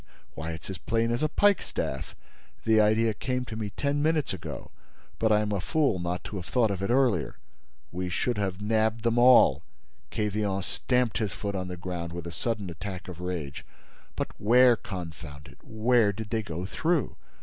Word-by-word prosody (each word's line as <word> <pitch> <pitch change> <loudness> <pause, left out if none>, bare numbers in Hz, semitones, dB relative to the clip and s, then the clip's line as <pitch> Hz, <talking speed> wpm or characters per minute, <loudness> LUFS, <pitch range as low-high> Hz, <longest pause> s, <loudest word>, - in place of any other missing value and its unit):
Why, 80 +1 -5
it's 80 - -8
as 95 -3 -6
plain 115 +2 0
as 120 - -1
a 155 - +2
pikestaff! 160 - 0 0.5
The 110 -1 +5
idea 110 +1 +3
came 125 +3 -2
to 110 - -7
me 110 -2 -3
ten 140 +8 -1
minutes 155 -5 +1
ago—but 110 +4 -5
I'm 105 0 +2
a 100 -3 0
fool 145 - +1
not 85 +1 -3
to 105 - -6
have 90 - -6
thought 120 -4 +2
of 95 -1 -3
it 100 - -1
earlier. 120 - +2 0.5
We 90 +1 -3
should 120 +5 -1
have 95 0 -2
nabbed 110 +1 +1
them 115 0 +2
all." 120 - +7 0.5
Quevillon 105 - -1
stamped 125 +3 0
his 105 -5 -1
foot 100 -1 -4
on 95 -2 -3
the 90 0 -6
ground, 85 -1 -5
with 85 -1 -6
a 85 - -5
sudden 105 -1 -3
attack 90 +3 -7
of 90 -1 -8
rage. 85 -6 -4 0.5
"But - - -2
where, 120 +3 +6
confound 80 -8 -8
it, - - -17
where 110 -1 +3
did 105 +1 -7
they 115 -1 +1
go 90 -3 -5
through? 160 - 0
105 Hz, 180 wpm, -28 LUFS, 90-120 Hz, 0.5 s, all